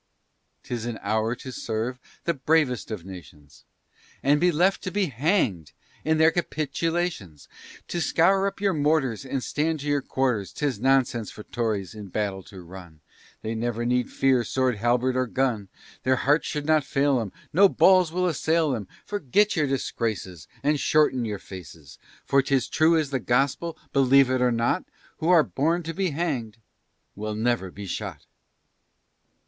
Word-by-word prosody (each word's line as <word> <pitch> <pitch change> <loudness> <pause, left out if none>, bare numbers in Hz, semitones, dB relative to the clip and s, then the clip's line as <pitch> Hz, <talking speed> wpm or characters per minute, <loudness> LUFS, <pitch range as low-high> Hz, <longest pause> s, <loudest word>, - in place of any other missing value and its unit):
'Tis 120 -2 -4
an 115 -2 -4
hour 110 +2 0
to 130 +2 -9
serve 115 +2 -3 0.2
the 170 - +1
bravest 140 -3 +1
of 105 -6 -6
nations, 75 -6 -13 0.6
And 145 +2 +3
be 180 0 +4
left 180 +5 +2
to - - -3
be 205 0 +1
hanged 120 - 0 0.3
in 160 0 +2
their 160 +1 +5
capitulations. 160 - -2 0.4
Then 175 - -2
scour 190 +5 +3
up 200 - -5
your 200 -1 +1
mortars, 145 -6 +1
And 135 -1 -3
stand 155 0 -1
to 145 - -6
your 145 -1 +1
quarters, 125 -8 -1
'Tis 140 -8 -2
nonsense 125 -3 +2
for 105 - -10
Tories 105 -6 -2
in 105 -2 -9
battle 100 0 -2
to 95 -2 -11
run, 85 -3 -12 0.4
They 110 - -2
never 120 +1 -2
need 125 +1 +1
fear 130 -3 +2
sword, 130 -2 0
halberd, 120 +3 +1
or 130 0 +1
gun; 115 -6 -1 0.3
Their 130 0 +2
hearts 145 +5 +2
should 150 -1 -3
not 155 -1 +3
fail 135 0 +1
'em, 110 -5 -4 0.2
No 195 +4 +6
balls 185 -4 +5
will 180 +2 0
assail 160 -3 +1
'em, 105 -5 -6 0.2
Forget 205 +2 +1
your 155 -4 +1
disgraces, 110 - -3 0.2
and 150 0 +2
shorten 135 -6 +2
your 105 -2 -3
faces, 80 -7 -12 0.3
For 140 - +4
'tis 135 -2 0
true 165 +1 +4
as 150 -3 -1
the 135 - 0
gospel, 135 +7 0 0.2
believe 135 -1 +5
it 130 -1 +1
or 125 -1 +3
not, 120 +10 +1 0.3
Who 165 +1 -1
are 170 -4 +6
born 165 +6 0
to 165 +1 -5
be 190 +2 0
hang'd, 140 -9 -3 0.6
will 105 +1 -4
never 110 -3 0
be 100 +3 -9
shot. 95 - -5
130 Hz, 165 wpm, -25 LUFS, 110-155 Hz, 0.6 s, No